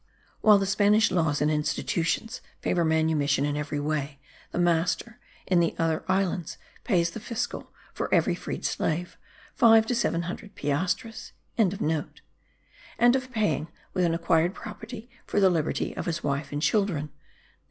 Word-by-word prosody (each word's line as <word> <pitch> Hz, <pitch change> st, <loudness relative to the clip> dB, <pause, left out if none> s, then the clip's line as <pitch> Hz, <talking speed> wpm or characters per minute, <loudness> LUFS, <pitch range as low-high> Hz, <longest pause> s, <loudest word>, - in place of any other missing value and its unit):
While 210 Hz, -1 st, +6 dB
the 195 Hz, -, 0 dB
Spanish 210 Hz, +2 st, +3 dB
laws 160 Hz, -5 st, +1 dB
and 150 Hz, -, +2 dB
institutions 165 Hz, +7 st, -1 dB, 0.2 s
favour 175 Hz, -, +1 dB
manumission 155 Hz, -3 st, +2 dB
in 145 Hz, 0 st, -1 dB
every 150 Hz, 0 st, -3 dB
way, 145 Hz, -1 st, -2 dB, 0.3 s
the -, -, -5 dB
master, 175 Hz, +7 st, +1 dB, 0.3 s
in 180 Hz, -2 st, +3 dB
the 170 Hz, -1 st, +1 dB
other 165 Hz, -1 st, 0 dB
islands, 185 Hz, -3 st, -1 dB, 0.3 s
pays 170 Hz, -7 st, +2 dB
the 225 Hz, -, -7 dB
fiscal, 225 Hz, +1 st, -4 dB, 0.2 s
for -, -, -4 dB
every -, -, +3 dB
freed -, -, -5 dB
slave, 170 Hz, +3 st, -1 dB, 0.4 s
five 225 Hz, -2 st, +6 dB
to 245 Hz, -, -1 dB
seven 205 Hz, -8 st, 0 dB
hundred 200 Hz, +4 st, -7 dB
piastres!), 180 Hz, +10 st, -2 dB, 0.2 s
and 210 Hz, -6 st, +3 dB, 1.4 s
of 260 Hz, -1 st, -3 dB
paying, 165 Hz, -, 0 dB, 0.3 s
with 185 Hz, -, +1 dB
an 165 Hz, -1 st, +2 dB
acquired 170 Hz, +2 st, +2 dB
property, 220 Hz, +1 st, -8 dB, 0.2 s
for -, -, +1 dB
the 190 Hz, -2 st, +5 dB
liberty 160 Hz, -3 st, -1 dB
of -, -, -4 dB
his 170 Hz, -1 st, -2 dB
wife 140 Hz, 0 st, -2 dB
and 145 Hz, +1 st, -3 dB
children. 175 Hz, -10 st, +1 dB
170 Hz, 150 wpm, -27 LUFS, 155-210 Hz, 1.4 s, While